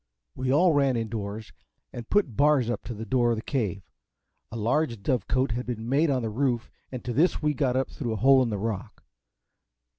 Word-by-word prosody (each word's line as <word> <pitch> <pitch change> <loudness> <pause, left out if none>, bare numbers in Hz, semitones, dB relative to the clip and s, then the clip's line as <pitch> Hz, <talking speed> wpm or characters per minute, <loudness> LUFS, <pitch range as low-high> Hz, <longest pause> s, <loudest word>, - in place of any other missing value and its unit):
We 130 0 -1
all 170 +4 +4
ran 135 -4 +2
in 115 -1 -3
doors, 105 0 -5 0.4
and 120 -1 -8
put 190 - +1
bars 145 -4 +3
up - - -4
to 120 - -5
the 110 +2 -6
door 120 -1 +2
of 115 - +2
the 110 - -6
Cave. 100 - -2 0.7
A 115 - -5
large 115 -1 0
dove 125 -3 0
cote 130 0 +1
had 120 +2 -3
been 115 -2 -4
made 145 +5 +2
on 130 -3 0
the 110 - -1
roof, 120 0 -1 0.2
and 130 -2 -7
to 120 - -2
this 155 +4 +2
we 150 0 +2
got 130 -3 0
up 130 +1 0
through 120 -7 -3
a 110 - -5
hole 135 -1 +7
in 125 - +1
the 105 - -2
rock. 105 -2 -5
125 Hz, 220 wpm, -26 LUFS, 115-135 Hz, 0.7 s, hole